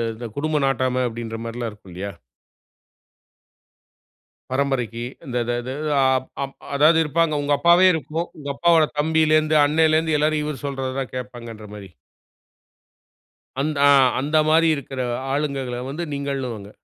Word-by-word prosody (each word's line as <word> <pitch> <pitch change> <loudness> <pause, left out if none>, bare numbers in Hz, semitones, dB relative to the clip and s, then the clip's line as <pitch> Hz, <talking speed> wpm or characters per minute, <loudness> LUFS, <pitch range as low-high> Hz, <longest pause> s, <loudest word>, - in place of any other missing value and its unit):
இந்த 120 +1 -7
குடும்பம் 150 -1 0
நாட்டாம" 130 -1 0
அப்படின்ற 115 -1 -6
மாரிலா 115 0 -4
இருக்கும் 105 -3 -16
இல்லையா? 100 +3 -5 2.4
பரம்பரைக்கு. 130 -4 -1 0.2
இந்த 125 -2 -3
இத 120 +1 -2
த - - -3 0.3
அ - - +4 0.4
அப் 135 0 -7 0.2
அதாவது 155 +3 +5
இருப்பாங்க. 160 +1 +1
உங்க 145 0 0
அப்பாவே 175 +3 +6
இருக்கும். 160 +2 -3
உங்க 145 -1 -6
அப்பாவோட 165 0 +4
தம்பியிலேந்து, 155 0 +3
அண்ணலேந்து 160 +1 +2
எல்லாரும் 150 0 +1
இவர் 150 -2 -5
சொல்றததான் 135 -1 -4
கேட்பாங்கன்ற 120 -4 -8
மாதிரி. 100 -2 -10 1.7
அந்த 150 +1 -2
ஆ - - +6 0.3
அந்த 150 +4 0
மாரி 165 +1 +4
இருக்குற 135 -2 -6 0.3
ஆளுங்கள்கள 135 -4 -2
வந்து 155 +5 -4
நீங்கள்னுவாங்க. 135 -7 -4
140 Hz, 125 wpm, -22 LUFS, 125-155 Hz, 2.4 s, அப்பாவே